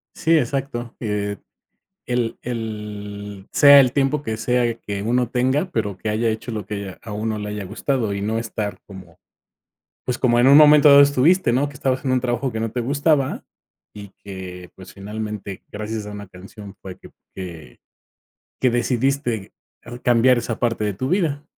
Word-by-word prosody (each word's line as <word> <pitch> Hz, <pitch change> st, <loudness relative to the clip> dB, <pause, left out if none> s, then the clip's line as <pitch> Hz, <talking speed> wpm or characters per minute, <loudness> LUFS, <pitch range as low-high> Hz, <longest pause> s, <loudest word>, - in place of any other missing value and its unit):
Sí, 165 Hz, 0 st, +3 dB
exacto, 130 Hz, -3 st, -3 dB
eh, 105 Hz, -2 st, -2 dB, 0.7 s
el 120 Hz, -2 st, -1 dB
el 105 Hz, -3 st, -6 dB
sea 140 Hz, -1 st, +8 dB
el 130 Hz, -3 st, +3 dB
tiempo 140 Hz, +1 st, +1 dB
que 110 Hz, -5 st, -3 dB
sea 120 Hz, +1 st, 0 dB
que 100 Hz, -3 st, -6 dB
uno 120 Hz, +2 st, +1 dB
tenga, 130 Hz, +8 st, 0 dB
pero 105 Hz, -, -2 dB
que 110 Hz, -, -5 dB
haya 110 Hz, +2 st, 0 dB
hecho 110 Hz, +2 st, -3 dB
lo 105 Hz, -2 st, -5 dB
que, 100 Hz, -2 st, -5 dB
eh, -, -, -13 dB
a 110 Hz, -, -8 dB
uno 110 Hz, +1 st, -2 dB
le 105 Hz, 0 st, -5 dB
haya 105 Hz, -1 st, -5 dB
gustado 110 Hz, +3 st, -2 dB
y 100 Hz, -, -3 dB
no 110 Hz, +3 st, -1 dB
estar 110 Hz, -2 st, -4 dB
como 90 Hz, -3 st, -13 dB, 0.9 s
pues, 125 Hz, -1 st, -2 dB
como 120 Hz, -2 st, +2 dB
en 120 Hz, -, +5 dB
un 140 Hz, +1 st, +8 dB
momento 150 Hz, -1 st, +8 dB
dado 140 Hz, 0 st, +9 dB
estuviste, 140 Hz, +2 st, +3 dB
¿no?, 135 Hz, +4 st, +1 dB
que 145 Hz, -, -14 dB
estabas 130 Hz, 0 st, -1 dB
en 130 Hz, -, 0 dB
un 130 Hz, -, +3 dB
trabajo 125 Hz, +1 st, -2 dB
que 110 Hz, -, -4 dB
no 115 Hz, -1 st, -2 dB
te 125 Hz, -, -2 dB
gustaba 140 Hz, +2 st, 0 dB, 0.5 s
y 100 Hz, -1 st, -10 dB
que, 90 Hz, -2 st, -9 dB
pues, 95 Hz, -, -13 dB
finalmente, 105 Hz, -1 st, -6 dB
gracias 105 Hz, 0 st, -5 dB
a -, -, -7 dB
una 100 Hz, 0 st, -8 dB
canción 100 Hz, +2 st, -12 dB
fue 95 Hz, -1 st, -9 dB
que -, -, -15 dB, 0.3 s
que 85 Hz, -9 st, -9 dB, 0.8 s
que 130 Hz, -, +3 dB
decidiste, 120 Hz, -2 st, -1 dB, 0.3 s
uh, 120 Hz, +1 st, -8 dB
cambiar 125 Hz, +1 st, +4 dB
esa 115 Hz, -1 st, -4 dB
parte 115 Hz, -2 st, 0 dB
de 105 Hz, -1 st, -1 dB
tu 130 Hz, +8 st, -3 dB
vida. 155 Hz, -6 st, 0 dB
115 Hz, 185 wpm, -21 LUFS, 105-130 Hz, 0.9 s, dado